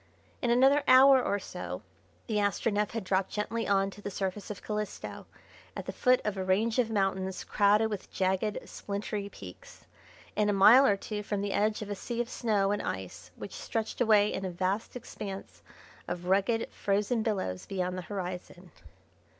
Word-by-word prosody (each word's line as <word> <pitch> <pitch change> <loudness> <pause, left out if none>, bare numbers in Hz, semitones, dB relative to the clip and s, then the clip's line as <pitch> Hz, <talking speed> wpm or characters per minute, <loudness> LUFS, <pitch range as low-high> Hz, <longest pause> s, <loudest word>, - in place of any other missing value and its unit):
In 245 - 0
another 270 +4 +5
hour 265 +1 +8
or 200 - 0
so 180 - -6 0.4
the 215 - -1
Astronef 205 +1 +1
had 225 -2 -3
dropped 190 0 0
gently 225 +2 -2
on 195 0 +2
to 205 - -13
the 205 - -4
surface 195 +1 -4
of 210 - -7
Calisto 210 -1 -5 0.5
at - - -5
the - - -4
foot 255 -1 +3
of 210 -1 -1
a 190 - -1
range 215 +6 +1
of 235 -3 +2
mountains 190 -3 -1
crowded 210 +2 +3
with 205 -3 -6
jagged 190 +3 0
and - - -9
splintery 200 0 -4
peaks, 95 - -12 0.5
and 210 -1 +2
a - - +2
mile 235 +8 +8
or 200 - +3
two 210 +1 -5
from 205 -1 -3
the 200 -1 -2
edge 215 +1 +1
of 205 - -9
a - - -2
sea 235 +4 -5
of 240 0 -1
snow 205 -4 +1
and 205 - 0
ice 90 -1 -6
which 200 - -8
stretched 225 +2 -4
away 210 -3 +4
in 190 - -3
a 190 - -2
vast 185 +6 -2
expanse 200 -5 -8 0.5
of 175 0 -4
rugged 200 +5 +1
frozen 210 +4 0
billows 190 - -2
beyond 185 -2 -2
the 185 - -4
horizon. 180 -2 -6
205 Hz, 185 wpm, -30 LUFS, 190-220 Hz, 0.5 s, hour